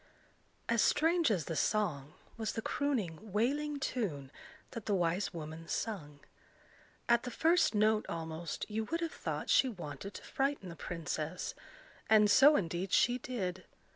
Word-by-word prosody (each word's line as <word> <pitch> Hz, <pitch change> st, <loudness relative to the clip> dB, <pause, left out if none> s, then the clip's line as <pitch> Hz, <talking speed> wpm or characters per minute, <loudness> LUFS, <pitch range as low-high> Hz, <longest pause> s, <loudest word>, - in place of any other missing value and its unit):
As 235 Hz, -2 st, +3 dB
strange 325 Hz, +1 st, +3 dB
as 180 Hz, -9 st, 0 dB
the 165 Hz, -, -3 dB
song, 155 Hz, -9 st, 0 dB, 0.2 s
was 220 Hz, -2 st, -3 dB
the 225 Hz, -, -3 dB
crooning 220 Hz, -, -2 dB
wailing 285 Hz, +8 st, 0 dB
tune 170 Hz, -, -3 dB, 0.4 s
that 230 Hz, -4 st, -7 dB
the 205 Hz, -, +2 dB
wise 175 Hz, +2 st, 0 dB
woman 160 Hz, -1 st, -7 dB
sung. 150 Hz, -10 st, -4 dB, 0.9 s
At 235 Hz, 0 st, +4 dB
the 250 Hz, -, -5 dB
first 325 Hz, +1 st, +3 dB
note 215 Hz, +1 st, +3 dB
almost, 160 Hz, 0 st, -4 dB
you 220 Hz, +1 st, -2 dB
would 330 Hz, +8 st, -2 dB
have 335 Hz, -, -1 dB
thought -, -, -3 dB
she 265 Hz, -, +5 dB
wanted 180 Hz, -, -7 dB
to -, -, -8 dB
frighten 275 Hz, -8 st, -1 dB
the 170 Hz, -, -8 dB
princess; 165 Hz, 0 st, -4 dB, 0.6 s
and 210 Hz, -1 st, +6 dB
so 285 Hz, +7 st, +8 dB
indeed 175 Hz, -, -1 dB
she 245 Hz, +1 st, +3 dB
did. 190 Hz, -8 st, -4 dB
210 Hz, 150 wpm, -33 LUFS, 170-250 Hz, 0.9 s, so